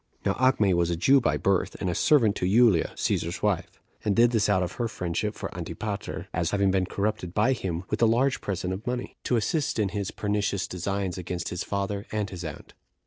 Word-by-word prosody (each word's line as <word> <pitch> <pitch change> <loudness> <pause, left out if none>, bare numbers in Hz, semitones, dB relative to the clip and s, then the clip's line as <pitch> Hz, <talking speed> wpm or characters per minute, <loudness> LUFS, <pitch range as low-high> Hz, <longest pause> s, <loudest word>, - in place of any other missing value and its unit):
Now - - +2
Acme 125 -7 +4
was 85 -1 +2
a 85 - 0
Jew 135 +11 +4
by 80 -8 +1
birth, 95 +3 +1
and 95 - -2
a 90 - 0
servant 115 - +4
to 90 - 0
Julia, 110 -5 +4
Cæsar's - - -1
wife; - - -1 0.2
and 105 -2 +1
did 120 +1 +5
this 110 -3 +2
out 95 -3 +3
of 90 - -3
her 120 - +1
friendship 105 +1 -3
for - - -6
Antipater, 105 -2 -5
as 85 -1 0
having 100 -1 +2
been 95 -1 +1
corrupted 100 -3 -2
by 125 +6 +3
him 90 -7 -3
with - - -1
a 115 - +6
large 130 +4 +2
present 95 -1 -2
of 100 +6 -7
money, 125 0 -3
to 125 - +2
assist 135 +7 0
in 105 -3 +1
his 100 -1 -3
pernicious 100 -2 -1
designs 95 +1 -3
against 90 -1 -4
his 90 - -3
father 100 0 -3
and 105 -1 -2
his 90 -2 -6
aunt. 80 -3 -8
100 Hz, 215 wpm, -27 LUFS, 90-110 Hz, 0.2 s, a